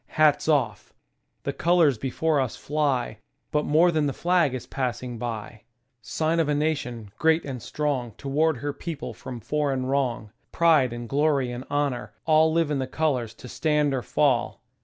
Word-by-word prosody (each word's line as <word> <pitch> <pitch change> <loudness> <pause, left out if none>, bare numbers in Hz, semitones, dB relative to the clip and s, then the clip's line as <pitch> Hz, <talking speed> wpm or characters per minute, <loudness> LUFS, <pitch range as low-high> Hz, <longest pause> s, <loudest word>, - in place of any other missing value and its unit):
Hats 155 -1 +3
off! 130 -10 0 0.5
The - - -2
colors 165 -8 +3
before 150 +4 0
us 130 -4 -2
fly, 140 -7 -1 0.3
But 150 0 +1
more 165 +4 +4
than 155 -3 +1
the 140 - -2
flag 170 -5 +2
is 125 - -6
passing 125 -2 -3
by. 115 -3 -4
• - - -18
• - - -16
• - - -19 0.4
Sign 160 +8 -1
of 160 -3 +1
a 150 - +2
nation, 130 -8 -2
great 160 +1 +3
and 130 -4 -5
strong 135 -4 -2
To - - -8
ward 155 +2 +2
her 145 +3 -3
people 160 0 -6
from 125 -2 -8
foreign 140 -1 -1
wrong: 125 -5 -1 0.2
Pride 155 -7 +4
and 120 0 -6
glory 140 -2 +1
and 120 +1 -6
honor, 140 -7 -1
— - - -50
all 160 0 +4
Live 165 -2 +1
in 145 - 0
the 130 - -2
colors 130 -7 -1
to 125 - -11
stand 150 +1 +1
or 130 - -1
fall. 130 -2 0
140 Hz, 190 wpm, -25 LUFS, 125-155 Hz, 0.5 s, more